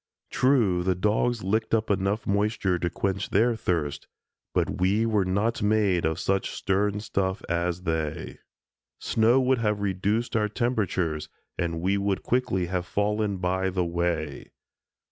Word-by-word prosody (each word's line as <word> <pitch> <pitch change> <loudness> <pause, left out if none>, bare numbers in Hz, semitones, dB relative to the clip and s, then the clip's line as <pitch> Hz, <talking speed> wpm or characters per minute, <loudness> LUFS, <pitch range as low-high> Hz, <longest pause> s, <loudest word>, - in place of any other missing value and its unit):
True, 115 -10 +3
the 90 +1 +1
dogs 105 +4 +1
licked 110 +4 +1
up 110 -1 0
enough 100 +2 0
moisture 100 -3 +1
to 85 - 0
quench 100 +2 -2
their 115 +4 +3
thirsts, 75 -9 -2 0.4
but - - -1
we 100 +5 +3
were 105 -4 +2
not 100 +5 0
made 105 -4 +2
of 80 0 0
such 95 0 0
stern 100 +2 0
stuff 95 -2 -2
as 85 +1 -1
they. 80 -3 -3 0.6
Snow 115 +3 +3
would 130 -1 +2
have 105 -2 0
reduced 100 +4 -1
our 105 -2 +2
temperatures 100 -9 -1 0.3
and 85 -1 -2
we 100 +3 +1
would 100 -1 -1
quickly 115 -8 0
have 90 0 -3
fallen 105 0 0
by 95 +1 0
the 90 -1 -1
way. 85 -4 -2
100 Hz, 145 wpm, -26 LUFS, 90-110 Hz, 0.6 s, True